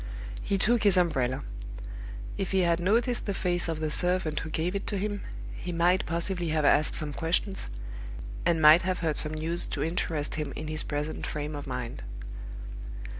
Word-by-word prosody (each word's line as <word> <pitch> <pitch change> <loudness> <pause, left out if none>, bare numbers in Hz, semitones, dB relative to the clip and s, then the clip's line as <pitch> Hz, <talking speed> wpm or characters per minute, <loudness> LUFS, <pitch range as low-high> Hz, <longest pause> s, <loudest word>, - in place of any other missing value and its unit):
He 195 - 0
took 230 +4 +4
his 200 -3 +6
umbrella. 135 -8 +1 0.9
If 195 - -2
he 190 -1 +2
had 170 -1 +2
noticed 230 +7 +2
the 200 - -1
face 175 -1 +2
of 160 -1 -2
the 155 -1 -1
servant 180 -3 +4
who 155 - -5
gave 165 +3 -1
it 200 - -3
to 205 - 0
him, 205 +1 -2 0.3
he 180 - -5
might 175 +2 +2
possibly 170 +1 -1
have 155 -1 +1
asked 150 +1 +5
some 150 -2 -1
questions, 170 - -1 0.7
and 170 -1 +2
might 155 +2 +8
have 185 0 -1
heard 155 -2 +1
some 155 0 +3
news 165 +3 -1
to - - -2
interest 160 -2 -1
him 140 -3 -4
in 155 +1 -5
his 155 0 +2
present 150 +1 -3
frame 150 0 -4
of 145 - -6
mind. 125 -2 -4
170 Hz, 180 wpm, -28 LUFS, 155-185 Hz, 0.9 s, might